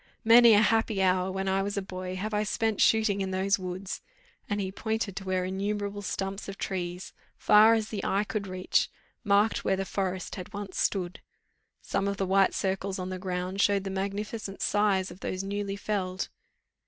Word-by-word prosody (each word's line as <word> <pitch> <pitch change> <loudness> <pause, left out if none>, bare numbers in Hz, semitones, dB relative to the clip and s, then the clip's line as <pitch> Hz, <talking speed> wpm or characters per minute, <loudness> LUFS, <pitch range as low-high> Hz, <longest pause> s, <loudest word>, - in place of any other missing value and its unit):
Many 230 0 +8
a 205 - +6
happy 225 -1 +2
hour, 185 0 +2
when 190 0 -3
I 190 0 +2
was 200 +1 -3
a - - +1
boy, 185 -1 -5
have 210 +4 -4
I 210 - +2
spent 215 +1 0
shooting 215 -3 +3
in 190 - -1
those 190 +1 +1
woods," 185 +1 -5 0.5
and 205 -1 0
he 190 -1 -2
pointed 220 -1 -2
to 195 - -4
where 185 -1 0
innumerable 200 +2 -2
stumps 195 0 -4
of 195 - -7
trees, 180 -1 -4 0.2
far 215 +2 +6
as 220 -1 -1
the 205 -3 -4
eye 200 +2 +1
could 210 -1 -4
reach, 185 0 +1 0.3
marked 205 +2 +3
where 190 - +2
the 195 0 -2
forest 190 -1 -3
had 185 +2 -8
once 200 -2 -5
stood: 180 -3 -1 0.6
some 200 - -1
of 200 0 -2
the 195 - 0
white 195 0 +3
circles 190 0 -1
on 185 0 -4
the 185 0 -4
ground 185 +1 -2
showed 200 -1 +3
the 195 - -4
magnificent 200 +1 -4
size 200 -2 +2
of 180 - -12
those 185 -1 -3
newly 200 0 -3
felled. 195 -3 -2
195 Hz, 190 wpm, -28 LUFS, 190-205 Hz, 0.6 s, Many